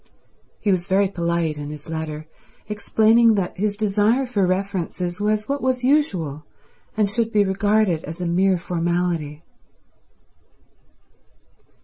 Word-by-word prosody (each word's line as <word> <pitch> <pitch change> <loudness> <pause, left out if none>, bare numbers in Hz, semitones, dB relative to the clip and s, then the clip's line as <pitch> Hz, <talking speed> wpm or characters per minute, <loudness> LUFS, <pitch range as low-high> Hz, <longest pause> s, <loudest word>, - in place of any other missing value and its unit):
He 205 - +1
was 180 -2 0
very 195 +1 +3
polite 170 -4 -1
in 145 0 -6
his 150 -1 -9
letter, 160 -1 -5 0.4
explaining 220 +2 +3
that 190 -3 -2
his 205 +1 -1
desire 215 +5 +2
for 205 -7 0
references 185 -1 -2
was 215 0 0
what 280 0 -2
was 255 -1 0
usual 185 - +1 0.5
and 210 -2 +3
should 225 +2 0
be 210 -2 +4
regarded 195 -3 +1
as 160 +3 -7
a 180 - -3
mere 185 +2 +2
formality. 170 -3 -2
190 Hz, 125 wpm, -22 LUFS, 170-215 Hz, 0.5 s, be